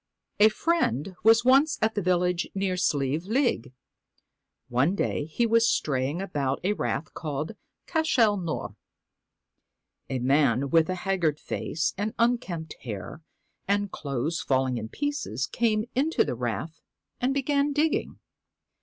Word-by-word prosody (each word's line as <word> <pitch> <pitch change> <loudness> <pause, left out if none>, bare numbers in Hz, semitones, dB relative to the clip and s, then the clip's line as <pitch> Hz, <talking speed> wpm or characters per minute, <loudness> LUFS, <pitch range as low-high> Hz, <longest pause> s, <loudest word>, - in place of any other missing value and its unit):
A 215 +1 +8
friend 195 - 0
was 225 +2 +5
once 275 +4 +5
at 220 0 +1
a 205 - 0
village 180 -1 +1
near 190 -1 0
Sleive 150 -2 0
League. 230 - 0 1.0
One 130 +10 +2
day 150 - -1
he 160 +10 0
was 230 0 +4
straying 140 +5 0
about 140 -8 -2
a 200 +3 +2
rath 155 -6 -3
called 150 0 -4 0.2
' - - -57
Cashel 260 -10 +3
Nore.' 170 -4 -4 1.3
A 130 - -1
man 135 0 +2
with 165 0 +4
a 185 - 0
haggard 170 -6 +1
face 160 - -2
and 210 +1 -2
unkempt 230 -10 -1
hair, 110 - -7 0.5
and 205 0 0
clothes 145 +3 -2
falling 130 -2 +1
in 110 0 -6
pieces, 290 - -2
came 215 - 0
into 295 +5 +2
the - - -2
rath 125 +7 -4 0.4
and 250 +2 +1
began 280 +1 +1
digging. 300 +2 0
180 Hz, 135 wpm, -27 LUFS, 140-230 Hz, 1.3 s, A